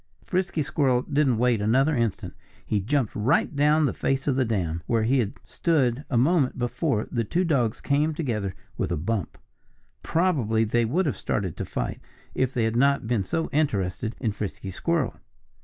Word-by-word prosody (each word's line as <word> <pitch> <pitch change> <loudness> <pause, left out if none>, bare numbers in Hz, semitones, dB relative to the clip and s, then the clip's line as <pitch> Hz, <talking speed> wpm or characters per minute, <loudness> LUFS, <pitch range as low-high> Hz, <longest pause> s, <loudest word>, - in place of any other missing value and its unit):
Frisky 180 -4 0
Squirrel 135 -4 +1
didn't 140 -5 +1
wait 120 -2 +2
another 135 +8 +3
instant. 115 -5 -1 0.3
He 105 - 0
jumped 125 +4 0
right 120 +7 +1
down 150 +2 +4
the - - 0
face 135 +1 -1
of 140 - +2
the 130 - +2
dam. 90 -8 -1
Where 115 -2 +2
he 130 +4 +2
had 110 -4 -1
stood 130 -1 0
a 125 - +1
moment 140 +1 +2
before 120 -1 -1
the 120 -2 0
two 175 - 0
dogs 130 -9 +1
came 150 +2 +1
together 110 - -2 0.2
with - - -1
a - - 0
bump. 95 +2 -2 0.6
Probably 135 - +1
they 115 +2 +1
would 170 +12 +1
have 145 - -1
started 95 -6 -2
to - - -3
fight, - - -3 0.3
if 130 -1 0
they 120 -3 0
had 110 0 0
not 140 +1 +3
been 115 -3 0
so 160 - -2
interested 110 - -1
in 110 - 0
Frisky 100 -1 -5
Squirrel. 165 - -1
125 Hz, 180 wpm, -25 LUFS, 110-145 Hz, 0.6 s, down